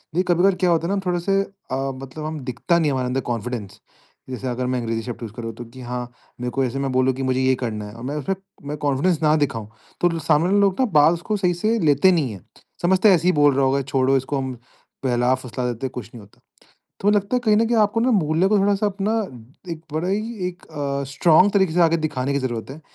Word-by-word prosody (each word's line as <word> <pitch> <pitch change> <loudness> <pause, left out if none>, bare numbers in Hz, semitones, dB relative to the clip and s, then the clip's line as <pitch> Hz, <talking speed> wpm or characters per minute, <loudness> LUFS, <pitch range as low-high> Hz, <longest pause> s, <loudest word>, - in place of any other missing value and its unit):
देखिए 180 - +3
कभी-कभार 180 +2 +3
क्या 180 0 +1
होता 170 0 +2
है 195 - 0
ना 200 - 0
थोड़े-से 180 +2 +1
अ, 135 -9 -4
मतलब 145 +4 -7
हम 155 0 -4
दिखता 170 +8 +1
नहीं 160 - +1
है - - -1
हमारे 130 -1 -1
अंदर 130 +2 -1
कॉन्फिडेंस, 115 -3 -5 0.5
जैसे 130 0 -5
अगर 125 0 -2
मैं 125 0 0
अंग्रेजी 115 -1 -2
शब्द 120 +1 -7
यूज़ 110 - -6
करूँ 115 0 -6
तो 120 - -8
कि 120 +3 -13
हाँ, 125 0 -4 0.4
मेरे 125 0 -2
को 135 +2 0
ऐसे 130 +2 -3
मैं 135 -1 -1
बोलूँ 130 +1 +2
कि 135 - -4
मुझे 130 0 +1
ये 130 0 +3
करना 110 -4 -4
है 105 - -10
और 115 - -10
मैं 140 +3 -3
उसमें 150 +6 -2 0.3
मैं 150 +1 -4
कॉन्फिडेंस 150 +4 +1
ना 155 0 +4
दिखाऊँ, 115 -8 -1 0.3
तो 175 - +4
लो 165 -1 -3
सामने 155 0 +2
वाले 200 +2 +3
लोग 195 +1 +2
ना 260 - +4
बाल 155 +3 +6
उसको 205 +5 -2
सही 180 -2 +1
से 215 +7 0
लेते 150 +6 +5
नहीं 150 -9 +1
है। 95 - -10 0.4
समझते 185 +4 +4
है 190 - +7
ऐसे 170 +1 -1
ही - - +6
बोल 145 -1 +4
रहा 135 0 +3
होगा 135 +1 +2
छोड़ो 135 0 +2
इसको 135 +2 -2
हम 130 -1 -3 0.5
बहला-फुसला 125 0 0
देते 120 +3 -5
हैं - - -10
कुछ 115 -5 -7
नहीं 120 - -9
होता। 100 0 -20 0.6
तो 205 - +3
लगता 210 +4 +1
है - - +1
कहीं 215 -2 +4
न 225 +2 +3
कहीं 235 +1 +1
आपको 215 +1 +2
ना 250 +3 +2
मूल्य 175 -3 +2
को 210 0 +3
थोड़ा-सा 200 +1 +2
अपना 200 +2 -1 0.6
एक 160 - -7
बड़ा 160 +4 -1
ही 215 +4 -2
एक 180 0 -11
अ, 140 -2 -3
स्ट्रांग 170 +6 +5
तरीके 190 -5 +2
से 175 - +2
आगे 165 -1 +4
दिखाने 140 -4 -2
की 140 - +1
ज़रूरत 120 -3 -4
है, 145 +4 -9
150 Hz, 255 wpm, -22 LUFS, 130-185 Hz, 0.6 s, है